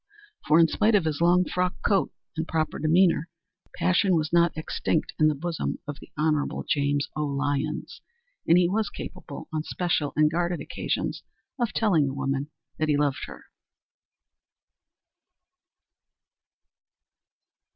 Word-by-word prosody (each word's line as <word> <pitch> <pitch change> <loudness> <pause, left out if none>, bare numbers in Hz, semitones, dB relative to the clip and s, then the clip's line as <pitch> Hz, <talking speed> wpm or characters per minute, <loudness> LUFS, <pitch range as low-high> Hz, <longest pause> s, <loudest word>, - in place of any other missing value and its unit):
For 155 +1 +5
in 165 - +6
spite 215 +6 +2
of 190 -5 +3
his 155 0 -2
long 180 +1 +4
frock 180 +1 -1
coat 200 -2 +2 0.2
and 160 +1 -3
proper 160 -1 -1
demeanor, 165 +1 +3 0.5
passion 185 +1 +2
was 155 0 -1
not 170 -1 +3
extinct 155 0 -1
in 155 - +5
the 155 - +2
bosom 165 +3 -3
of 145 -1 -6
the - - -14
Hon. 150 -1 0
James 145 -1 +1
O. 150 - -1
Lyons, 145 +1 -2 0.5
and 170 - +6
he 180 -1 +4
was 210 +4 0
capable 185 -6 -8
on 155 - 0
special 160 -3 -1
and 155 0 +4
guarded 175 +1 -1
occasions - - -3 0.4
of 240 -2 0
telling 170 -11 +2
a 135 - -6
woman 135 +1 -2 0.3
that 155 0 0
he 145 - +3
loved 145 -2 0
her. - - -11
160 Hz, 140 wpm, -26 LUFS, 150-175 Hz, 0.5 s, in